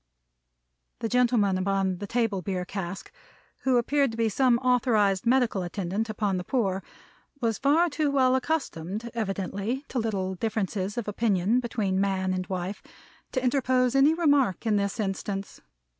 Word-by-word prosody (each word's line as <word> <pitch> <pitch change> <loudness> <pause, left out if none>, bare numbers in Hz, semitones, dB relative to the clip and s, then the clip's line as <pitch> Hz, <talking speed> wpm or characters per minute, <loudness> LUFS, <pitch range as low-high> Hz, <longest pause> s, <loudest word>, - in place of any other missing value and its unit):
The 230 - -2
gentleman 235 -6 +2
upon 190 -1 0
the 205 - -5
table 225 -4 0
beer 180 -1 -3
cask, 190 0 -6 0.5
who 260 -2 +2
appeared 275 +3 +2
to 225 - -7
be 225 -1 +2
some 245 +2 +3
authorized 235 -5 +2
medical 245 -5 +2
attendant 195 +4 -3
upon 205 -3 -1
the 180 - -3
poor, 195 -4 0 0.6
was 230 -4 -1
far 300 +6 +4
too 305 -2 0
well 260 -2 +3
accustomed, 235 - -2
evidently, 205 +4 -3
to 255 - -1
little 195 -4 -1
differences 205 0 -2
of 235 - -3
opinion 210 +1 +1
between 205 -6 -1
man 190 -1 0
and 185 0 -3
wife, 185 +1 -4 0.5
to 255 - -1
interpose 255 -1 +2
any 275 +4 +5
remark 285 - +2
in 220 -2 +2
this 200 +1 -1
instance. 195 -1 -3
215 Hz, 150 wpm, -27 LUFS, 195-250 Hz, 0.6 s, any